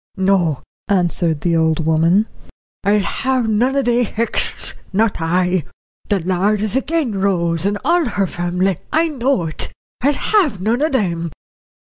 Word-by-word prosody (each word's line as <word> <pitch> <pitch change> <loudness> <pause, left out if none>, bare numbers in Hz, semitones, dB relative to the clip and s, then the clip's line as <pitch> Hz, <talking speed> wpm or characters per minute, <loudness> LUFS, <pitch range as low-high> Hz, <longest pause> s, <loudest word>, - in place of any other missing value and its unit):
"No," 185 -7 +1 0.2
answered 175 -5 +1
the 170 +1 +1
old 160 -1 +1
woman, 165 +6 +3 0.6
"I'll 205 +1 +3
have 260 +3 -1
none 235 +5 +1
o' 275 - +2
they 245 0 +2
Hexts, 230 +1 -1 0.2
not 210 +2 +1
I. 180 +1 +1 0.5
The 205 -2 +2
Lord 190 +4 +1
is 215 0 -1
agin 270 -8 0
Rose 170 -2 +1
and 205 0 0
all 340 +1 +3
her 205 -5 0
family, 180 +1 -1
I 325 +1 +2
know 265 - 0
it. 155 -1 -3 0.3
I'll 285 +3 +3
have 320 - +1
none 225 +7 0
of 310 -1 +1
them." 170 -8 0
200 Hz, 150 wpm, -18 LUFS, 175-245 Hz, 0.6 s, woman